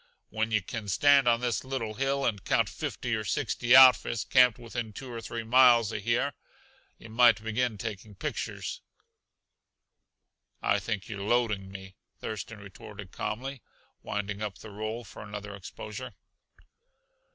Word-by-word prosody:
"When 110 +1 -1
yuh 105 -3 +1
can 110 +2 -6
stand 140 +6 +5
on 120 0 +4
this 120 -2 -1
little 130 -5 -3
hill 135 +3 0
and 100 -4 -1
count - - +2
fifty 120 - -4
or 110 - -3
sixty 120 +5 +2
outfits 130 -3 +7
camped 125 -3 +5
within 115 -2 -6
two 130 +3 -8
or 115 - -5
three 115 0 -5
miles 120 -2 +5
uh - - -1
here, 120 +7 0 0.6
yuh - - -12
might 115 -2 +5
begin 110 0 -1
taking 105 -1 -6
pictures." 95 - -4 1.8
"I 100 - +2
think 100 0 -4
you're 100 -2 -6
loading 105 -3 0
me," 95 0 -9 0.3
Thurston 110 +1 -6
retorted 100 -1 -11
calmly, 130 +4 -4 0.4
winding 105 0 -4
up 105 -3 -4
the 110 +1 -11
roll 110 +3 -4
for - - -11
another 105 -1 -7
exposure. 105 +6 -8
110 Hz, 145 wpm, -29 LUFS, 105-120 Hz, 1.8 s, outfits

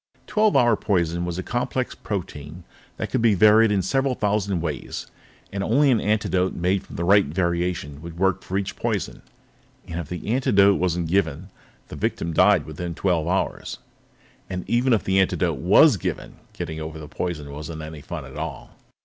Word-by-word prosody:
Twelve 215 -1 +2
hour 120 -2 +5
poison 85 -5 0
was 85 -1 -4
a 95 - -3
complex 125 +2 -2
protein 85 -4 -6
substance - - -28
that - - -4
could - - +1
be 115 -3 +4
varied 105 +3 +6
in 100 -2 +1
several 135 +7 +1
thousand 105 -2 0
different 85 - -2
ways, 75 -3 -4 0.5
and 100 0 -2
only 135 +6 +3
an 115 - +2
antidote 100 -3 0
made 90 +2 +1
from - - -12
the 85 - -2
right 100 -1 +5
variation 85 -3 -2
would 85 0 -9
work 95 +1 +1
for 95 - -3
each 100 -1 -3
poison. - - -3 0.7
If 85 -2 -5
the 90 +1 -6
antidote 100 -6 +4
wasn't 90 -2 0
given, 90 0 -1 0.4
the - - -7
victim 85 0 -2
died 95 -1 +4
within 85 +2 -6
twelve 85 -4 0
hours. 95 +2 -2 0.7
And 90 -1 -5
even 125 +2 +2
if 115 - +3
the 95 0 +2
antidote 90 -5 +1
was 100 - +6
given, - - -5 0.2
getting 80 -2 -5
over 80 -1 -7
poison 75 -3 -4
wasn't 75 +2 -7
any 75 -1 -8
fun - - -6
at - - -11
all. - - -6
90 Hz, 180 wpm, -23 LUFS, 85-105 Hz, 0.7 s, varied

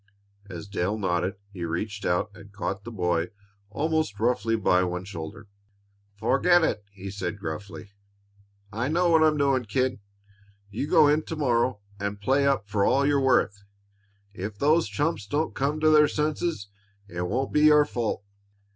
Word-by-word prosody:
As 90 +1 -7
Dale 100 +1 -1
nodded 95 0 -1 0.2
he 90 -3 -6
reached 100 +5 -3
out 90 +4 0
and 100 -1 -14
caught 100 0 -4
the 120 - -6
boy 90 -4 0 0.4
almost 155 -3 -1
roughly 115 -1 +1
by 90 -4 +3
one 90 0 -3
shoulder. 100 +3 -8 0.7
"Forget 160 - +3
it!" 105 -9 0
he 100 -1 -8
said 100 -1 -4
gruffly. 100 +3 -7 0.8
"I 115 +4 -1
know 170 +3 +2
what 160 -1 +5
I'm 155 -1 +4
doing, 135 -3 +2
kid. 125 +4 0 0.7
You 115 +8 -3
go 150 - +6
in 150 +2 +3
to 160 - -5
morrow 120 -6 +1 0.2
and 100 0 -3
play 135 +6 +2
up 135 -7 +1
for 100 0 0
all 135 +6 +3
you're 140 -1 +2
worth. 115 -6 +2 0.7
If 100 +2 -5
if - - -27
those 155 +6 +3
chumps 145 -9 -1
don't 150 +7 -1
come 145 +3 -1
to 155 - +5
their 150 -1 +6
senses, 150 - -2 0.4
it 90 -2 -5
won't 130 +7 -2
be 150 - +3
your 150 -1 +6
fault." 115 -6 -3
110 Hz, 165 wpm, -26 LUFS, 100-145 Hz, 0.8 s, go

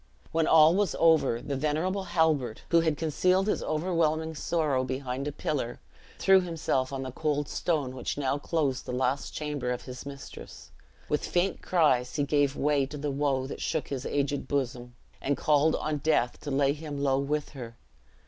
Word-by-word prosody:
When 165 -1 +1
all 160 0 +7
was 200 -2 +1
over, 155 -8 +3
the 140 - -3
venerable 160 +8 -1
Halbert, 155 -9 +1
who 170 - +5
had 160 -3 +1
concealed 180 +5 +2
his 210 - 0
overwhelming 160 -1 0
sorrow 150 -4 0
behind 130 +1 -3
a - - -1
pillar, 135 -4 -3 0.4
threw 190 -1 +5
himself 160 -7 -1
on 135 -1 -3
the 130 - -5
cold 145 +1 -1
stone 145 -7 -1
which 130 - -4
now 140 0 0
closed 145 -4 -1
the 125 - -3
last 130 +2 -1
chamber 150 -4 -3
of 125 -1 -3
his 125 -1 -8
mistress. 140 -2 -10 0.4
With 150 - 0
faint 180 +2 0
cries, 130 -8 +2
he 145 - +1
gave 145 -1 +1
way 145 -2 +1
to 150 - -7
the 145 0 -2
woe 135 -2 0
that 135 - -7
shook 160 - -2
his 135 -2 -3
aged 140 0 -1
bosom, 125 -3 -2 0.3
and 140 0 0
called 150 +1 +3
on 155 -1 -2
death 140 -5 +1
to - - -6
lay 140 0 +2
him 150 -1 -6
low 135 -1 +1
with 150 +1 -1
her. 120 -4 -9
145 Hz, 180 wpm, -28 LUFS, 135-160 Hz, 0.4 s, all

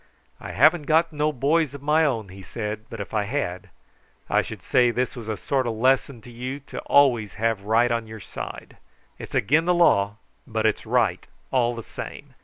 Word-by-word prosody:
"I - - -7
haven't 155 - +4
got 165 +1 +3
no 150 +1 +1
boys 145 +2 +1
of 140 - -10
my 155 +2 +3
own," 115 -8 -1
he 95 +1 -11
said, 105 +2 -5
"but 115 - -8
if 100 - -7
I 105 -2 +1
had, 100 -7 -3 0.6
I - - +4
should - - -9
say 125 -1 +3
this 125 +3 -1
was 115 -3 -7
a 110 - -2
sort 130 +4 -1
o' - - 0
lesson 130 +2 +1
to 120 - -13
you 125 +4 -5
to 140 - -8
always 125 -7 +3
have 110 -2 -1
right 115 +3 +3
on 115 -1 -1
your 110 0 -9
side. - - -8 0.4
It's - - -8
again' 150 +10 +3
the 180 0 +3
law, 100 -12 +3 0.3
but - - -1
it's - - 0
right - - +1 0.2
all 120 -2 +2
the 115 - -6
same. - - -9
120 Hz, 205 wpm, -24 LUFS, 110-145 Hz, 0.6 s, haven't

